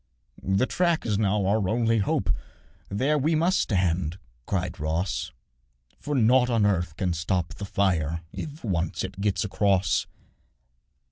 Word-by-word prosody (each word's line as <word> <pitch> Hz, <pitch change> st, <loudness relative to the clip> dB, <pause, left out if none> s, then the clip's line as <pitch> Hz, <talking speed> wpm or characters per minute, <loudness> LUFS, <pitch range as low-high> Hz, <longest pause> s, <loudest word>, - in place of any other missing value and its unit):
'The 95 Hz, +6 st, +2 dB
track 170 Hz, +2 st, +1 dB
is 105 Hz, -3 st, 0 dB
now 105 Hz, -1 st, +1 dB
our 100 Hz, -1 st, +1 dB
only 115 Hz, 0 st, +2 dB
hope, 100 Hz, -, +1 dB, 0.6 s
There 140 Hz, +9 st, +1 dB
we 155 Hz, +4 st, +2 dB
must 175 Hz, +4 st, +2 dB
stand,' 90 Hz, -4 st, 0 dB, 0.3 s
cried 90 Hz, -2 st, -2 dB
Ross, 80 Hz, +5 st, -2 dB, 0.7 s
'For 145 Hz, 0 st, -3 dB
nought 125 Hz, +1 st, +4 dB
on 115 Hz, -3 st, +3 dB
earth 90 Hz, -5 st, 0 dB
can 90 Hz, 0 st, -1 dB
stop 85 Hz, +1 st, -1 dB
the 100 Hz, -, -6 dB
fire 85 Hz, -5 st, 0 dB
If 150 Hz, 0 st, -7 dB
once 85 Hz, -5 st, -1 dB
it 95 Hz, +1 st, -6 dB
gets 105 Hz, -1 st, +1 dB
across.' 100 Hz, -2 st, +1 dB
100 Hz, 140 wpm, -26 LUFS, 90-115 Hz, 0.7 s, nought